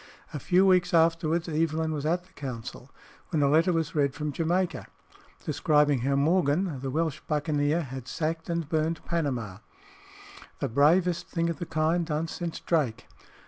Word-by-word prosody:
A 150 - -3
few 180 +7 +3
weeks 180 -2 +3
afterwards 165 0 +2
Evelyn 160 0 0
was 150 0 -3
at 175 +2 0
the 185 - -26
council, 125 -6 -7 0.4
when 150 -3 +1
a - - +4
letter 160 +5 +4
was 165 -2 -1
read 140 -3 +1
from 150 0 -3
Jamaica, 175 +4 -1 0.6
describing 150 -3 +2
how 135 +3 0
Morgan, 155 +1 +1
the 135 +1 -4
Welsh 160 +1 -1
buccaneer, 150 +1 0
had 130 -2 -8
sacked 160 +3 -3
and 170 -2 -2
burned 160 +1 -1
Panama; 125 - -2 1.0
the - - -2
bravest 170 +8 +3
thing 170 -1 -1
of 165 - -7
the 175 - -5
kind 160 +2 +1
done 155 +1 -1
since 170 0 -5
Drake. 130 -8 0
160 Hz, 160 wpm, -27 LUFS, 145-170 Hz, 1.0 s, a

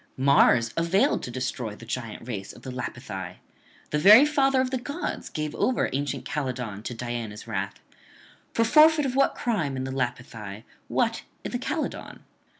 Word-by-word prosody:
Mars 130 -4 +4
availed 170 +4 +2
to - - -6
destroy 125 -3 -3
the 115 - -12
giant 115 -1 -5
race 100 -5 -5
of - - -16
the 130 - -6
Lapithae; 95 -8 -6 0.6
the 150 - +1
very 210 - +9
father 275 -3 +3
of 260 0 +1
the 260 - -1
gods 285 +8 -4
gave 150 -1 -3
over 255 - +1
ancient 140 -1 -2
Calydon 125 -8 -3
to 120 - -4
Diana's 115 -3 -5
wrath: 100 -3 -4 0.7
for 230 - +2
forfeit 305 +4 +6
of 260 -1 -2
what 275 0 +3
crime 170 - -1
in 130 - -2
the 130 - -4
Lapithae, 120 -5 -4 0.2
what - - 0 0.2
in - - -4
Calydon? - - -4
130 Hz, 160 wpm, -26 LUFS, -, 0.7 s, very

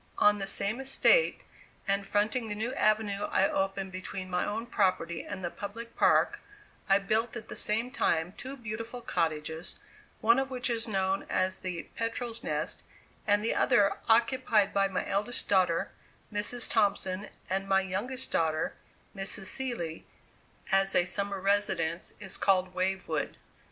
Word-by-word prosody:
On 210 0 +4
the 195 - -3
same 200 +5 0
estate, 275 - +3 0.4
and 195 0 +1
fronting 215 +4 +1
the 210 - -3
new 225 +4 -2
avenue 210 -4 +1
I 190 - +2
opened 195 0 -1
between 185 0 -6
my 180 0 0
own 225 +3 -3
property 185 -7 0
and 190 - -7
the 175 - -2
public 230 +3 -7
park, - - +3 0.5
I 195 - +7
built 220 +4 0
at 230 -2 -7
the - - -6
same 225 +4 +2
time 170 -8 0
two 265 +2 -8
beautiful 230 +1 -6
cottages, 160 -3 -2 0.4
one 230 +4 +4
of 270 0 -1
which 250 -1 0
is 230 0 0
known 195 -2 0
as 185 0 0
the 180 -3 -4
"Petrel's 230 0 -3
Nest," - - -2 0.5
and 205 0 +3
the - - +1
other, 205 -6 +3
occupied 225 -3 +3
by 195 0 +3
my 190 - -3
eldest 210 +5 -1
daughter, 180 -4 +2 0.4
Mrs. 210 +4 +1
Thompson, 200 -2 0 0.2
and 195 +1 -2
my 195 0 +4
youngest 245 +8 -2
daughter, 160 -1 +1 0.4
Mrs. 195 0 -1
Seeley, 200 -9 -1 0.6
as 195 0 +3
a 175 - +4
summer 200 +2 0
residence, 190 -4 0
is 190 -3 -2
called 185 -2 +2
"Wavewood." 190 +1 -2
200 Hz, 150 wpm, -30 LUFS, 190-230 Hz, 0.6 s, I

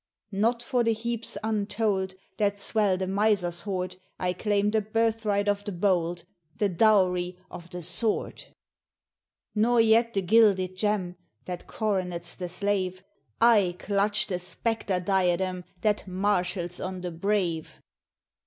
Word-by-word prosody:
"Not 230 +4 +1
for 245 0 +1
the 230 0 +2
heaps 230 +1 -3
untold 205 -3 -1 0.2
That 205 -1 +1
swell 200 -1 +1
the 190 - -2
Miser's 190 -3 +1
hoard, 185 -2 -3 0.2
I 180 0 0
claim 205 +2 +1
the 220 0 +2
birthright 215 -1 0
of 205 0 +1
the 205 - -4
bold, 175 -2 0 0.3
The 205 -2 +1
dowry 180 -2 +3
of 175 0 -9
the 180 0 -7
Sword 220 +6 -1 1.1
"Nor 230 +3 +3
yet 230 +1 +4
the 195 - +1
gilded 190 -2 +4
gem 185 -3 -1 0.3
That 180 -1 -6
coronets 180 -5 -2
the 180 -1 -5
slave 185 -1 -1 0.4
I 210 -6 +5
clutch 205 +2 +1
the 180 -4 -3
spectre 190 +1 -2
diadem 185 -1 0 0.2
That 210 -2 0
marshals 180 -2 -1
on 185 0 -4
the 180 -1 -4
brave. 175 -2 -1
200 Hz, 135 wpm, -27 LUFS, 180-215 Hz, 1.1 s, I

